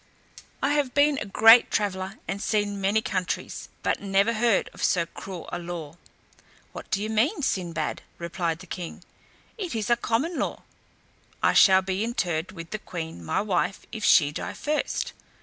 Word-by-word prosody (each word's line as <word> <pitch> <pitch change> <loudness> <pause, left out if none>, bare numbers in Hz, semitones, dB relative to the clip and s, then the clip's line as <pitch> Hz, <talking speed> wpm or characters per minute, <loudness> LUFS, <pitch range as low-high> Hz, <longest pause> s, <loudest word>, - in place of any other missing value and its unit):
I 280 +2 +3
have 285 -4 0
been 285 0 +4
a - - -4
great 225 +4 +7
traveller, 195 -1 -1
and 200 - -3
seen 205 -2 0
many 205 +3 +2
countries, 185 -4 -3
but - - 0
never 200 +3 +2
heard 230 -2 +2
of - - -7
so 170 -2 +3
cruel 180 +1 -8
a - - -2
law." 170 -3 -6 0.8
"What - - -9
do 195 +2 0
you - - -2
mean, 240 - +1
Sinbad?" 170 - -1 0.2
replied 170 -1 -3
the - - -10
king: 175 -1 -7 0.6
"it 360 - -3
is 220 +1 -1
a - - +7
common 275 +10 -1
law. - - -3 0.8
I - - +4
shall 190 -1 +7
be 190 +2 -1
interred 185 -7 -1
with 165 -3 -9
the 215 - -3
queen, 160 - -6
my 80 - 0
wife, 195 -1 -1
if 220 -2 -6
she 145 -7 +5
die - - -5
first." 300 0 -2
195 Hz, 170 wpm, -26 LUFS, 175-225 Hz, 0.8 s, great